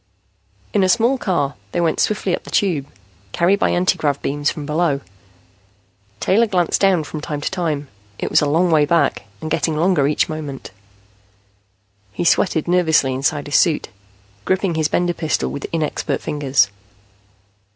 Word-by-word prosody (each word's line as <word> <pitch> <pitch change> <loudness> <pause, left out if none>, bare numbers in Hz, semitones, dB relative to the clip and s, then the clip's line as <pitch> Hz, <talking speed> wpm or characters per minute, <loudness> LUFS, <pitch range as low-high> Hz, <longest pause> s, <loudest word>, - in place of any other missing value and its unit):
In 195 - +3
a 185 - +2
small 240 +5 +3
car, 160 -10 0 0.2
they 175 - 0
went 165 -2 +1
swiftly 200 -4 +1
up - - -12
the - - -11
Tube, 165 -9 0 0.5
carried 185 +4 +2
by - - +2
anti 180 0 +1
grav 145 -3 0
beams 145 +1 0
from 150 - -5
below. 150 -1 0 1.2
Taylor 225 +5 +3
glanced 180 -4 0
down 190 -5 +3
from 150 0 -7
time 150 -1 -4
to 145 - -3
time. 160 -6 -2 0.3
It - - -4
was - - +4
a 150 - +1
long 170 +4 +2
way 155 -2 +5
back, 150 -2 +1 0.2
and 155 - -5
getting 160 -1 0
longer 165 -4 +2
each 150 - +1
moment. 150 -7 -6 1.4
He 175 - -3
sweated 170 -2 +2
nervously 160 -6 +3
inside 145 +3 -1
his 145 - +2
suit, 165 -4 +2 0.5
gripping 190 -1 0
his 160 -1 +1
Bender 175 +2 0
pistol 160 -3 -1
with 140 - -5
inexpert 160 -2 -2
fingers. 135 -9 +1
160 Hz, 160 wpm, -19 LUFS, 145-180 Hz, 1.4 s, way